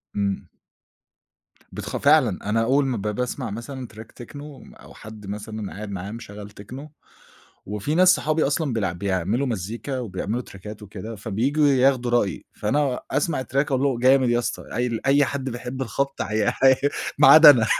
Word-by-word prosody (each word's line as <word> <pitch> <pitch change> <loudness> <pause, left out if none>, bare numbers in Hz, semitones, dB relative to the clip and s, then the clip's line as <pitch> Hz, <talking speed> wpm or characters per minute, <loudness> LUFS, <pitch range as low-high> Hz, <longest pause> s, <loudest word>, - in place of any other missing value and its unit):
إمم. 100 -1 -1 1.3
بتخ - - -5
فعلًا، 135 -10 +3
أنا 115 +2 +2
أول 135 +4 +2
ما 130 -3 -1
ب - - -5
باسمَع 120 +4 -3
مثلًا 125 +4 -7
Track 110 +1 -10 0.2
Techno، 145 +4 -10 0.4
أو - - -14
حد 105 -1 -11
مثلًا 105 0 -6
قاعد 105 0 -7
معايا 95 +1 -5
مشغّل 105 -3 -9
Techno، 130 +8 -9 0.8
وفي 105 +9 -3
ناس 185 +2 +6
صحابي 155 -1 0
أصلًا 145 0 -1
بيلع 100 -6 -1
بيعملوا 100 +7 -1
مزيكا 115 +4 -4
وبيعملوا 110 0 -3
تراكات 105 +2 -11
وكده، 105 +2 -8
فبييجوا 125 +9 +1
ياخدوا 130 -2 +3
رأيي، 120 -5 0
فأنا 130 +4 0
أسمَع 145 -3 0
الTrack - - -17
أقول 140 -2 +1
له: 135 -4 +1
"جامد 130 +1 +4
يا 120 0 +2
أسطى." 120 - -3
قايل 120 0 -1
أي 140 +1 +5
حد 135 -1 -3
بيحب 125 +2 -5
الخبط 135 +3 -2
عي 110 +2 -1 0.2
عي 130 -1 +7 0.4
ما 145 -2 +7
عدا 155 +2 +11
أنا. 120 -6 +4
120 Hz, 165 wpm, -23 LUFS, 105-135 Hz, 1.3 s, عدا